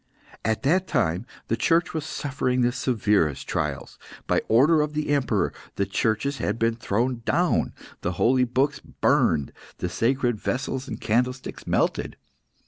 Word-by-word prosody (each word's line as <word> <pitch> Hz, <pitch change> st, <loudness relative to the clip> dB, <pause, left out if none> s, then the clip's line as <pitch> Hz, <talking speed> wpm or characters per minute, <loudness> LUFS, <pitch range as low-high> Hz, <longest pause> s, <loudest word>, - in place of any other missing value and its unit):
At 110 Hz, +3 st, 0 dB
that 180 Hz, +7 st, +2 dB
time 115 Hz, -, 0 dB, 0.2 s
the 115 Hz, -, +1 dB
Church 165 Hz, +7 st, +2 dB
was 160 Hz, -1 st, -3 dB
suffering 130 Hz, -3 st, -1 dB
the 120 Hz, 0 st, +3 dB
severest 105 Hz, -, +1 dB
trials. -, -, -3 dB, 0.3 s
By -, -, +2 dB
order 150 Hz, +8 st, +5 dB
of 150 Hz, 0 st, -2 dB
the 150 Hz, -1 st, -1 dB
Emperor, 125 Hz, -10 st, +1 dB, 0.2 s
the 100 Hz, -, 0 dB
churches 110 Hz, +7 st, 0 dB
had -, -, -1 dB
been 115 Hz, 0 st, +1 dB
thrown 120 Hz, +2 st, -1 dB
down, -, -, +1 dB, 0.3 s
the 90 Hz, -, -1 dB
holy 125 Hz, +6 st, +3 dB
books 135 Hz, +4 st, 0 dB
burned, 75 Hz, -4 st, +1 dB, 0.2 s
the 90 Hz, -, -3 dB
sacred 120 Hz, +2 st, +1 dB
vessels 130 Hz, +3 st, -2 dB
and 115 Hz, -5 st, -5 dB
candlesticks 125 Hz, +4 st, -1 dB
melted. -, -, 0 dB
125 Hz, 145 wpm, -25 LUFS, 110-140 Hz, 0.3 s, order